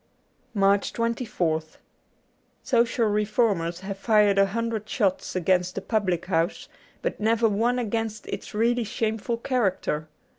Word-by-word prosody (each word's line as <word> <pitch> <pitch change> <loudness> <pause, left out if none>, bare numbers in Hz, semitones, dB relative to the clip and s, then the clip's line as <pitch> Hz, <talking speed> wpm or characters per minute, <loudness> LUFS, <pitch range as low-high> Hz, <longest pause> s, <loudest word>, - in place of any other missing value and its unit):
* 260 - -41
89 210 - -3
MARCH 200 +1 +3
24th 180 -10 -1 0.9
SOCIAL 235 -2 +2
reformers 205 -5 +1
have 195 0 -6
fired 210 -2 +4
a 195 - +5
hundred 225 0 -3
shots 195 -5 0
against 185 0 +1
the 195 - -3
public 195 -6 0
house, 170 0 -1 0.4
but - - -2
never 225 +1 +3
one 230 +4 +1
against 225 -1 -2
its - - -6
really 235 +2 +2
shameful 220 +1 -2
character. 195 - -1
210 Hz, 135 wpm, -25 LUFS, 190-230 Hz, 0.9 s, a